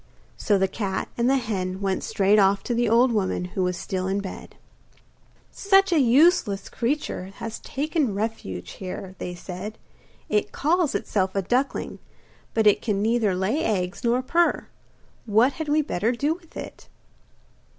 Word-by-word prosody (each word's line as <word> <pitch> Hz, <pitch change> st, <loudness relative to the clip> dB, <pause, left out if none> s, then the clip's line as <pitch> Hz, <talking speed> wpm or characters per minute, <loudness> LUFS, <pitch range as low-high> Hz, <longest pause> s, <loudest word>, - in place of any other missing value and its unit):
So 205 Hz, -3 st, +1 dB
the 190 Hz, 0 st, +2 dB
cat 190 Hz, 0 st, -3 dB
and 240 Hz, +1 st, +1 dB
the 270 Hz, -, +4 dB
hen 190 Hz, -6 st, -3 dB
went 195 Hz, -1 st, -1 dB
straight 200 Hz, +2 st, +3 dB
off 195 Hz, 0 st, +3 dB
to 240 Hz, -, -2 dB
the 235 Hz, -1 st, +1 dB
old 240 Hz, +3 st, +4 dB
woman, 195 Hz, -4 st, 0 dB
who 190 Hz, -, -1 dB
was 180 Hz, -1 st, 0 dB
still 185 Hz, 0 st, -3 dB
in 195 Hz, +1 st, 0 dB
bed. 195 Hz, -2 st, -8 dB, 1.0 s
'Such 390 Hz, -1 st, +3 dB
a 325 Hz, -, +4 dB
useless 260 Hz, -, +3 dB
creature 250 Hz, -6 st, -2 dB
has 225 Hz, -1 st, -6 dB
taken 290 Hz, -, -1 dB
refuge 200 Hz, -, -4 dB
here,' 185 Hz, 0 st, -7 dB
they 180 Hz, -, -5 dB
said. 190 Hz, +5 st, -7 dB, 0.5 s
'It 210 Hz, -1 st, 0 dB
calls 325 Hz, 0 st, +1 dB
itself 190 Hz, -2 st, -1 dB
a 195 Hz, -, 0 dB
duckling; 255 Hz, +8 st, -1 dB, 0.6 s
but 220 Hz, -1 st, +2 dB
it 210 Hz, -, +5 dB
can 205 Hz, -4 st, -1 dB
neither 220 Hz, -2 st, +1 dB
lay 210 Hz, -, 0 dB
eggs 185 Hz, 0 st, -1 dB
nor 245 Hz, +2 st, +2 dB
purr! 340 Hz, +5 st, +1 dB, 0.6 s
What 225 Hz, +6 st, +4 dB
had 315 Hz, -2 st, -5 dB
we 305 Hz, +1 st, +3 dB
better 225 Hz, -, 0 dB
do 290 Hz, +6 st, 0 dB
with 335 Hz, -1 st, -14 dB
it? -, -, -9 dB
220 Hz, 160 wpm, -24 LUFS, 190-265 Hz, 1.0 s, it